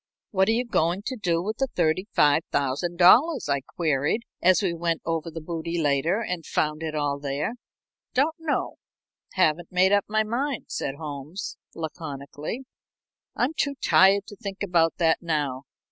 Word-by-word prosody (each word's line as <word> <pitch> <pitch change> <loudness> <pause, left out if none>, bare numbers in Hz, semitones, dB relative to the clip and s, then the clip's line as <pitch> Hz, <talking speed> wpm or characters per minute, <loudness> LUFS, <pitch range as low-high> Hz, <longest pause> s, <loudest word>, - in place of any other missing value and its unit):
"What 190 -1 +3
are - - +4
you 245 +2 0
going 180 -4 0
to 260 - -3
do 175 -7 0
with 215 +3 -3
the 270 - +1
$35,000?" 175 - +3
I 140 -1 +1
queried, 150 - -1 0.2
as 185 +3 +4
we 180 -3 +1
went 170 -1 -1
over 165 0 -2
the 165 0 -7
booty 170 +1 -3
later 155 +7 +1
and 180 -5 -3
found 155 0 -1
it 160 -1 -3
all 145 -1 -1
there. 145 +7 -2 0.6
"Don't 285 +5 +3
know 320 -3 -2 0.6
haven't 175 -2 +1
made 185 +1 +4
up 205 -1 +3
my 215 +1 +2
mind," 250 +5 -2
said 135 - -3
Holmes, 150 +4 -6 0.2
laconically. 155 - -6 0.7
"I'm 255 +6 0
too 285 -2 -1
tired 195 -5 +4
to 205 - -10
think 200 0 -6
about 170 -4 +2
that 165 -2 +2
now. 145 -5 -2
170 Hz, 155 wpm, -25 LUFS, 155-205 Hz, 0.7 s, are